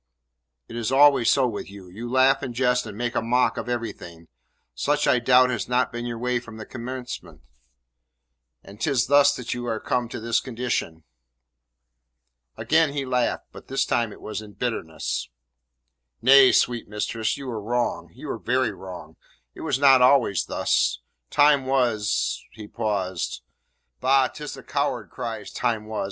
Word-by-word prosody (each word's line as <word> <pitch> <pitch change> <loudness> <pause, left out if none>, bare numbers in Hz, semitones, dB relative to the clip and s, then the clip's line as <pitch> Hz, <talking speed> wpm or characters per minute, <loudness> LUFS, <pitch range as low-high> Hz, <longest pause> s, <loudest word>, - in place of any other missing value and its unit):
"It - - -10
is 120 -1 -2
always 140 -3 +5
so 135 -2 +3
with 105 -4 -5
you. 100 -2 -12
You 110 +7 -8
laugh 130 +2 +4
and 120 -2 -5
jest 125 0 +1
and 100 - -8
make 120 0 -2
a - - 0
mock 115 0 +2
of 120 - -5
everything. 100 -8 -6 0.4
Such 145 - 0
I 125 - +4
doubt 125 +1 +5 0.2
not 125 0 +2
has - - -20
been 120 +1 -5
your 120 -1 -4
way 125 +1 0
from 115 -2 -12
the 110 - -8
commencement, 125 - -7 1.2
and 100 +3 -14
'tis 135 -4 +2
thus 145 +1 +5
that 125 -1 -4
you 120 0 -5
are 110 -2 -2
come 125 0 -1
to - - -6
this 115 +1 +1
condition." 120 -10 -3 1.5
Again 160 -2 +2
he 140 -2 -2
laughed, 125 -2 -1
but - - -13
this 135 - 0
time 115 -2 0
it - - -13
was 105 -1 -5
in 105 -1 -12
bitterness. 80 - -3 0.9
"Nay, 135 +1 +7
sweet 120 -1 +1
mistress, 110 +2 -2
you 140 -1 -8
are 110 -2 -4
wrong 120 +3 -2
you - - -11
are - - -5
very 130 0 0
wrong; 90 -4 -10 0.4
it - - -11
was - - 0
not 135 -2 +6
always 125 -7 +4
thus. 60 -1 +1 0.3
Time 145 -2 +4
was 120 -6 0
" - - -43
He 105 -1 -10
paused. 100 -6 -3 0.6
"Bah! 135 0 +3
'Tis 150 -2 -7
the 135 - -12
coward 135 -7 -2
cries 110 -3 -6
"time 115 -3 -1
was"! 110 0 -5
120 Hz, 170 wpm, -24 LUFS, 110-130 Hz, 1.5 s, Nay